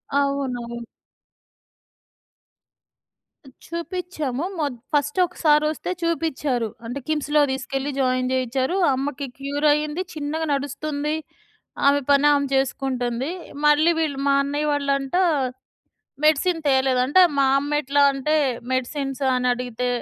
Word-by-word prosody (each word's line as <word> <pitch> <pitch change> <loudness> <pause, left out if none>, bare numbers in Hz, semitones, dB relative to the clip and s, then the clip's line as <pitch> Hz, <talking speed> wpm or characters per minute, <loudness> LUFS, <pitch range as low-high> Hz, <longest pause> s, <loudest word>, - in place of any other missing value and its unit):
అవునవును. 265 -4 -1 2.9
చూపిచ్చాము. 335 -5 -4
మొ 310 - 0 0.3
ఫస్ట్ 295 +2 +1
ఒకసారొస్తే 305 -2 +1
చూపిచ్చారు. 290 -8 -1 0.2
అంటే 245 +4 -4
కిమ్స్‌లో 300 -1 +1
తీసుకెళ్ళి 270 +2 -3
జాయిన్ 255 -1 +1
చేయిచారు. 260 +5 0 0.2
అమ్మకి 280 +1 -3
క్యూర్ 285 +2 -1
అయింది. 300 +3 -2
చిన్నగా 310 +1 -3
నడుస్తుంది. 285 +2 -2 0.7
ఆమె 285 0 +5
పని 280 +1 +4
ఆమె 280 -1 +1
చేసుకుంటుంది. 260 0 -1 0.3
మళ్ళీ 295 +3 +5
వీళ్ళు 295 -4 -1
మా 280 - +4
అన్నయ్య 290 +2 -1
వాళ్ళంట 280 0 -1 1.1
మెడిసిన్ 325 +3 +3
తేలేదంటే 265 +3 +3 0.2
మా 275 - +4
అమ్మ 285 +1 -3
ఎట్లా 285 0 +2
అంటే 275 +3 -1 0.4
మెడిసిన్స్ 270 +1 -2
అని 250 0 0
అడిగితే 250 0 -3
280 Hz, 100 wpm, -23 LUFS, 265-300 Hz, 2.9 s, ఆమె